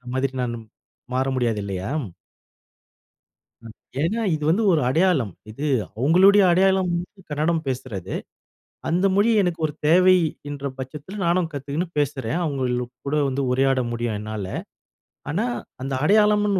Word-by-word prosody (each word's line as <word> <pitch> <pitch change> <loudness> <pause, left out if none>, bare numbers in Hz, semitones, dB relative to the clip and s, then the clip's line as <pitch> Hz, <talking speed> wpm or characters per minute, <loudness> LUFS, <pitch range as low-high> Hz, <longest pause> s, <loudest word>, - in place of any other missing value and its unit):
மாதிரி 130 0 0
நானும் 120 -2 -4 0.5
மாற 130 +1 +1
முடியாது 115 -4 0
இல்லையா? 95 +1 -4 1.8
ம். 110 - -9 0.3
ஏன்னா 215 +8 0
இது 155 - -4
வந்து 200 +7 +2
ஒரு 160 - +3
அடையாளம். 160 - +2 0.2
இது 140 +8 -4 0.3
அவங்களுடைய 190 - +6
அடையாளம் 190 0 +3 0.4
கன்னடம் 160 +2 0
பேசுறது. 125 -8 -4 0.8
அந்த 180 +4 +2
மொழி 205 +3 +4
எனக்கு 175 -3 -1
ஒரு 150 - -8
தேவை 185 +3 +6 0.3
என்ற 140 -1 -6
பட்சத்துல 150 +9 -7
நானும் 170 -1 +2
கத்துக்குன்னு 145 +5 -3
பேசுறேன், 145 +2 -1
அவங்கள 125 -4 -1 0.2
கூட 150 - 0
வந்து 135 +1 -1
உரையாட 135 0 +2
முடியும் 115 -2 -2
என்னால. 105 -2 -5 0.8
ஆனா, 200 +10 0 0.4
அந்த 135 0 -3
அடையாளம்னு 210 -1 +4
145 Hz, 125 wpm, -23 LUFS, 130-180 Hz, 1.8 s, அவங்களுடைய